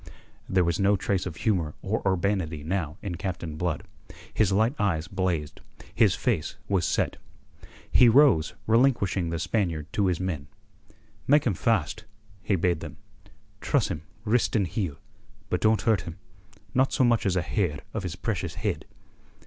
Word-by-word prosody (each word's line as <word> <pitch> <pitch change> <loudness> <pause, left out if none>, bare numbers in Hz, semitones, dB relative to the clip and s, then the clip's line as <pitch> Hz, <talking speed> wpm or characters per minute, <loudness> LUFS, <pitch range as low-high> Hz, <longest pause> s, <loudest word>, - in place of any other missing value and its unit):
There 95 -1 +3
was 85 -1 0
no 100 +1 +4
trace 95 -1 -1
of 80 - -6
humour 85 -7 0
or 105 +3 -1
urbanity 95 -5 0
now 80 -3 -2
in 90 -4 -4
Captain 85 -3 -4
Blood. 80 -2 -2 0.5
His 105 -3 +2
light 110 +6 +3
eyes 85 -6 0
blazed: 90 -7 -2 0.3
his - - +4
face 75 - -1
was 95 -4 +1
set. - - 0 0.7
He 125 - +7
rose, 120 - +5
relinquishing 110 -7 +2
the 85 - -2
Spaniard 85 -4 -1
to 100 -2 +2
his 90 -3 0
men. 85 -7 -3 0.8
"Make 145 +1 +5
him 115 - +2
fast," 105 +1 0 0.4
he 100 - +1
bade 85 -2 +1
them. - - -8 0.6
"Truss - - +1
him, 75 - -4 0.2
wrist 115 +3 +2
and 100 -3 +3
heel, 90 -5 -3 0.6
but 90 - 0
don't 110 0 +3
hurt 110 -7 +3
him 85 +1 -8 0.6
not 130 +1 +3
so 135 - +2
much 120 -4 +3
as 95 - +1
a 90 - +1
hair 90 -10 -1
of 110 - -2
his 90 -2 -4
precious 100 0 -3
head." - - -2
95 Hz, 165 wpm, -27 LUFS, 85-110 Hz, 0.8 s, He